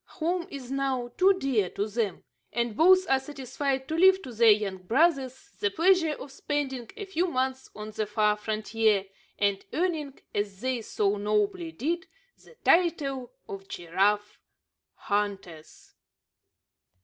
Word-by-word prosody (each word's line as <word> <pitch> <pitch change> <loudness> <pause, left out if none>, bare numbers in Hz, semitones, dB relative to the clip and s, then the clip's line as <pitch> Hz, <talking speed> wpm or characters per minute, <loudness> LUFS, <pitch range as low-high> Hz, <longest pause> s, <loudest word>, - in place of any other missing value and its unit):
Home 340 +1 -1
is 265 -3 -8
now 265 -3 -1
too 385 +2 +5
dear 245 - +1
to 205 - -2
them; 210 -4 -2 0.3
and 235 -2 -1
both 370 - +5
are 265 - +3
satisfied 265 0 -3
to - - -4
leave 380 +3 +6
to 250 - -8
their 230 0 +5
younger 205 -3 +2
brothers 265 - +1
the 205 - +2
pleasure 335 - +3
of 280 -1 -9
spending 270 -4 -3
a 410 - -5
few 370 -1 0
months 260 -3 -2
on 215 0 -7
the 215 -1 -2
far 210 0 +2
frontier, 215 -1 0 0.3
and 200 -1 +1
earning, 315 -6 -1
as 205 -2 -2
they 255 -1 -1
so 205 -1 0
nobly 210 - 0
did, 330 +4 -2 0.4
the - - -18
title 285 -8 +2 0.2
of 195 0 -8
Giraffe 200 +5 0 0.6
Hunters. 195 -6 -4
255 Hz, 140 wpm, -27 LUFS, 210-305 Hz, 0.6 s, leave